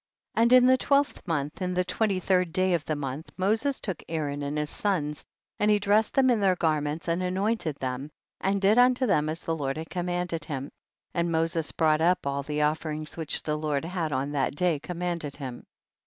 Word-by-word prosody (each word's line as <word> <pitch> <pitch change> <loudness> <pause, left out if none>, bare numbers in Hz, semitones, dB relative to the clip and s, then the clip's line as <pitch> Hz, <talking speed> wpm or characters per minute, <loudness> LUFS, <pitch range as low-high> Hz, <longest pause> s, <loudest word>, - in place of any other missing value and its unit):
And 230 +1 +3
in 255 -1 +8
the 260 0 +5
twelfth 280 +1 +2
month, 150 0 -2
in 180 0 -1
the 180 - +2
twenty 195 +1 0
third 180 -2 +1
day 185 +1 +2
of 165 -4 +1
the 155 - -1
month, 140 +2 -5
Mo 190 +3 +3
ses 270 +5 -1
took 190 -7 -4
Aaron 145 -3 -2
and 145 +1 -3
his 150 0 -2
sons, 155 -8 -1 0.4
and 210 - +3
he 210 - +5
dressed 205 +2 +2
llicm 260 -2 +5
in 235 - +2
their 190 -2 +3
garments, 155 -1 -1
and 170 +2 0
anointed 185 -2 -1
them 130 +1 -4 0.3
and 195 +1 +1
did 200 +4 +4
unto 255 +1 +4
them 155 -9 +2
as 160 +2 -4
the 165 - -2
Lord 140 -2 -2
had 160 +1 -7
commanded 175 -2 -2
him, 140 -2 -5 0.4
and 170 -1 0
Moses 165 0 0
brought 155 -1 +2
up 175 0 +2
all 140 0 -1
the 150 +1 -1
offerings 155 0 -2
which 160 -3 -3
the 150 - -1
Lord 150 -1 -1
had 170 -3 -2
on 135 +1 -1
that 140 -1 0
day 170 -2 +1
commanded 170 -3 -4
him. 130 -4 -7
165 Hz, 210 wpm, -27 LUFS, 150-190 Hz, 0.4 s, in